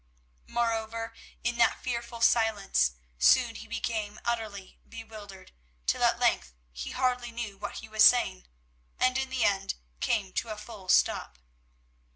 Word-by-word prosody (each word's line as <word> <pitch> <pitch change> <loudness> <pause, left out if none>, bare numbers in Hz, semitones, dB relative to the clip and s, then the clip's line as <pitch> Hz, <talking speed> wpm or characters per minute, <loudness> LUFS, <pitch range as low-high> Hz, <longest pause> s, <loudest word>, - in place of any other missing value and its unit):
Moreover, 225 -1 -1 0.3
in 240 0 0
that 235 - +3
fearful 235 -1 -4
silence, 220 - +3 0.3
soon 235 - +5
he 225 0 -9
became 225 -2 -3
utterly 220 -5 -3
bewildered, 215 -4 -10 0.3
till - - +1
at - - +4
length - - +1 0.2
he 60 +1 -5
hardly 250 -1 0
knew 230 -3 -5
what 205 +1 -6
he 220 - -10
was 215 0 +3
saying, 65 - +5 0.5
and 255 0 +3
in 265 0 -1
the 260 -2 0
end 195 -1 +1 0.2
came 195 -5 0
to 230 - -2
a 215 - -4
full 210 -3 -10
stop. - - +3
225 Hz, 145 wpm, -29 LUFS, 205-235 Hz, 0.5 s, soon